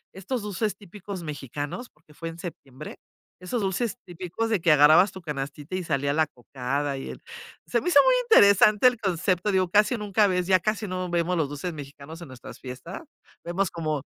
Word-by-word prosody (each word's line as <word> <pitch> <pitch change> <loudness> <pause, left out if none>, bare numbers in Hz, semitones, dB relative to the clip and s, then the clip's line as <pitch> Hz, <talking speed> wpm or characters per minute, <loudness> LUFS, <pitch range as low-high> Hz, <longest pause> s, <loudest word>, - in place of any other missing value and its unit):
estos 210 +6 -4
dulces 210 +1 -2
típicos 200 -1 -9
mexicanos, 145 - -6
porque 150 0 -24
fue 165 +1 -6
en 165 - -10
septiembre, 140 -7 -9 0.4
esos 185 +6 -3
dulces 200 +4 -1
típicos 180 +5 -4
de 220 -3 +1
que 165 - +4
agarrabas 155 +6 +6
tu 190 - -10
canastita 145 +1 -5
y 185 - -2
salía 140 -3 0
la 160 +1 +3
cocada, 135 +2 -4
y 135 - -6
el - - -11 0.5
se - - +1
me - - -1
hizo - - +7
muy - - +4
interesante 210 - +6
el 250 -1 +2
concepto, 185 0 0
digo, 185 -2 +1
casi 210 +6 +3
nunca 210 0 +2
ves 180 -2 0
ya 185 -1 +5
casi 215 +3 -2
no 185 -1 -3
vemos 175 +1 0
los 160 -3 +1
dulces 145 +5 -5
mexicanos 145 +2 -10
en 150 - -11
nuestras 130 -1 -11
fiestas, 130 - -8 0.4
vemos 175 +2 -1
como 155 -3 -3
180 Hz, 190 wpm, -26 LUFS, 150-200 Hz, 0.5 s, hizo